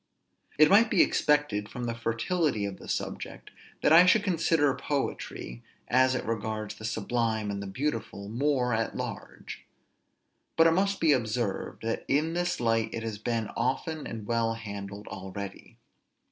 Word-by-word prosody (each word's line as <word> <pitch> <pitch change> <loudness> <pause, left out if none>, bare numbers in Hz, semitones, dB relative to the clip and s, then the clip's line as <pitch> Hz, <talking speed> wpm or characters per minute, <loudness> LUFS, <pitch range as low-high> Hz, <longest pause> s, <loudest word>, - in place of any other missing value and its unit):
It 155 +1 +8
might 220 +6 +6
be 195 - +5
expected, 145 -9 +1
from 125 - -6
the 120 -1 -1
fertility 115 - 0
of 100 -1 -5
the - - -11
subject, - - -4 0.3
that - - +5
I 175 +3 +8
should 215 +2 +5
consider 165 -6 +2
poetry, 130 - -4 0.3
as 130 +1 +4
it - - -3
regards 110 -1 -3
the 110 - -9
sublime 110 -1 -1
and 100 -1 -5
beautiful, 115 -6 -3
more 125 +1 +1
at 115 0 -1
large; - - -7 0.9
but 165 - +6
it 165 - +6
must 195 +3 +1
be 160 - +4
observed, 115 -6 -1
that 115 0 -2
in 155 +4 +1
this 175 +1 -1
light 115 -1 +1
it 115 - -4
has 110 -2 -4
been 115 -1 -2
often 155 +5 -2
and 110 -2 -6
well 115 0 0
handled 100 -2 -7
already. 95 +1 -8
115 Hz, 155 wpm, -28 LUFS, 110-150 Hz, 0.9 s, It